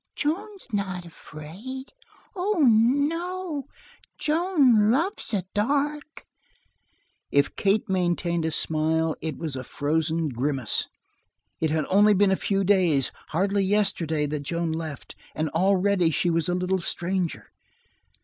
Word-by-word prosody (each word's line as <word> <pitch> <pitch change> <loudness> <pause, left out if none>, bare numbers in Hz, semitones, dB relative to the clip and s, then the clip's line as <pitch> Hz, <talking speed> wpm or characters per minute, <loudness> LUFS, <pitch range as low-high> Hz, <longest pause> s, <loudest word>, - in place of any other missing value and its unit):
"Joan's 390 +6 -3
not 190 -3 -2
afraid. 185 - -9 0.4
Oh, 380 -1 0
no! 290 +7 +1 0.5
Joan 300 - +3
loves 330 - 0
the 195 -5 -1
dark." 290 +7 -1 1.0
If 140 0 +2
Kate 210 +5 +1
maintained 175 -2 0
a 160 - 0
smile, 160 +1 0
it 155 -3 -4
was 155 -5 -4
a 130 - -5
frozen 160 +4 -1
grimace. 130 -1 -1 0.7
It 160 - +1
had 155 0 0
only 205 +2 +5
been 195 0 +4
a - - +4
few 195 +1 0
days 180 -9 +3 0.2
hardly 195 +4 +1
yesterday 180 -6 +1
that 150 0 -3
Joan 170 +3 -2
left, 160 -3 -6 0.2
and 155 0 -1
already 190 +1 +2
she 170 +2 +1
was 165 +1 0
a 180 - +1
little 180 +1 0
stranger. 175 0 -2
185 Hz, 125 wpm, -25 LUFS, 160-240 Hz, 1.0 s, only